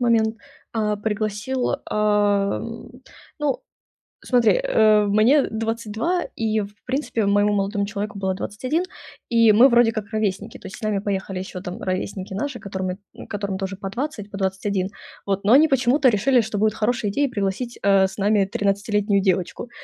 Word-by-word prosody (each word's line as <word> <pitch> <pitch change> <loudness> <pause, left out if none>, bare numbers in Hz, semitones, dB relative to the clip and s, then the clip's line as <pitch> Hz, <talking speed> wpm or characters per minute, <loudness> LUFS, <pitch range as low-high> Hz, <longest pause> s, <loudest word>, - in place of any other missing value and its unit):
момент, 225 -2 +2 0.4
а, 210 -2 0
пригласил 215 +4 -2 0.2
а, 205 -1 +2 0.8
ну, 295 -3 -1 0.6
смотри, 245 -3 +3
э, 220 - +3
мне 220 +8 +4
22, 225 +9 -2
и 220 -1 0
в 205 0 -6
принципе 255 -5 -1
моему 205 +1 +3
молодому 200 0 0
человеку 205 -1 -5
было 190 -1 -1
21, 255 - -2 0.5
и 230 -2 +5
мы 240 +6 +7
вроде 235 -2 +4
как 215 -1 -5
ровесники. 215 0 -2
То - - -12
есть 195 - -8
с - - -15
нами 215 -2 0
поехали 195 -1 -3
еще 185 0 -6
там 180 0 -7
ровесники 190 +1 -3
наши, 250 +4 -3
которыми 190 -2 -4 0.2
н - - -10
которым 200 -2 -3
тоже 195 0 -4
по 195 0 -5
20, 235 -4 -4
по 195 - -7
21. 190 0 -1 0.4
Вот 200 0 -1
но 210 - +4
они 305 +4 +7
почему-то 265 +1 +3
решили, 240 +4 +3
что 215 -1 -4
будет 215 0 +2
хорошая 220 -1 0
идея 280 +8 +1
пригласить, 210 +3 -3
э, 195 -1 +5
с 190 - -9
нами 205 0 +3
тринадцатилетнюю 200 0 0
девочку, 185 +4 -1
210 Hz, 165 wpm, -22 LUFS, 200-230 Hz, 0.8 s, мы